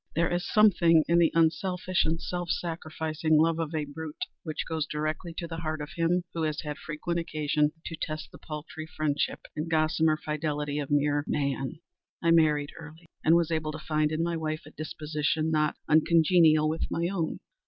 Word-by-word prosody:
There 165 +2 +1
is 175 0 -2
something 170 -6 +5
in 170 +1 +4
the 165 -2 +4
unselfish 180 +3 +2
and 165 +1 0
self 175 -1 -4
sacrificing 160 -2 -1
love 165 +1 +3
of 160 0 -2
a 155 -1 -1
brute, 150 +1 -6 0.2
which 155 -3 -4
goes 160 -2 -2
directly 155 +3 -3
to 170 - -3
the 165 -1 -6
heart 155 -1 -3
of 150 0 -6
him 175 +1 +1
who 165 - -3
has 155 -1 -1
had 150 -1 -5
frequent 170 +2 -3
occasion 150 -2 0
to 165 - -4
test 155 -1 -5
the - - -13
paltry 155 +1 -7
friendship 155 -2 -1
and 155 +2 -3
gossamer 155 0 +2
fidelity 150 -1 -2
of 145 - -4
mere 145 0 +2
Man. 140 +2 -2 0.4
I 165 - +2
married 150 -3 +3
early, 160 +1 -12 0.2
and 160 - +5
was 170 -1 +2
happy 155 -1 -1
to - - -5
find 155 0 0
in 160 +1 0
my 170 0 -1
wife 155 -1 -3
a - - -12
disposition 155 0 -2
not 150 -1 +2
uncongenial 160 0 +5
with 160 +1 -2
my 170 +1 0
own. 175 -4 -2
155 Hz, 185 wpm, -28 LUFS, 150-165 Hz, 0.4 s, something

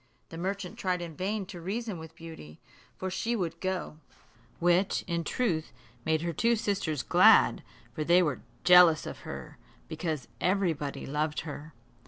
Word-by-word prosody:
The 165 - -8
merchant 190 0 -4
tried 180 -1 0
in 170 -2 -7
vain 200 +3 -2
to 180 -3 -9
reason 205 +1 -3
with 160 0 -11
Beauty, 160 - -11 0.4
for 190 0 -4
she 230 +5 -1
would 170 -5 -3
go; 185 -4 -3 0.6
which, 175 +3 +2
in 170 -1 -2
truth, 170 -8 -1 0.3
made 160 0 +1
her 170 -1 -2
two 235 +9 +2
sisters 190 - -1
glad, - - +6 0.3
for 155 - -2
they 175 +3 +5
were 150 -6 -1 0.2
jealous 180 -3 +7
of - - -7
her, - - -8 0.3
because 160 -4 -3
everybody 175 -7 0
loved 150 +2 -1
her. 150 -1 -8
170 Hz, 155 wpm, -29 LUFS, 160-190 Hz, 0.6 s, jealous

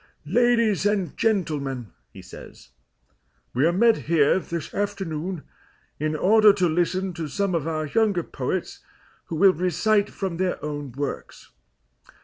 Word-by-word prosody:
"Ladies 230 -5 +2
and 195 -6 -1
gentlemen," 145 - -1 0.2
he - - -12
says, - - -13 0.8
"we 135 +6 +3
are - - +3
met 225 +5 +4
here 165 +1 +4
this 170 -3 -6
afternoon 190 -4 -3 0.6
in 155 +1 -1
order 215 +6 +6
to 185 -3 +1
listen 180 +3 0
to 165 -2 -5
some 195 +6 -1
of 165 -2 -1
our 155 -1 -2
younger 200 +2 +1
poets - - -4 0.5
who 165 - -5
will 190 +3 +5
recite 200 +5 +1
from 190 -4 -4
their 185 0 0
own 145 -3 -5
works. 140 +2 -6
180 Hz, 135 wpm, -24 LUFS, 155-200 Hz, 0.8 s, order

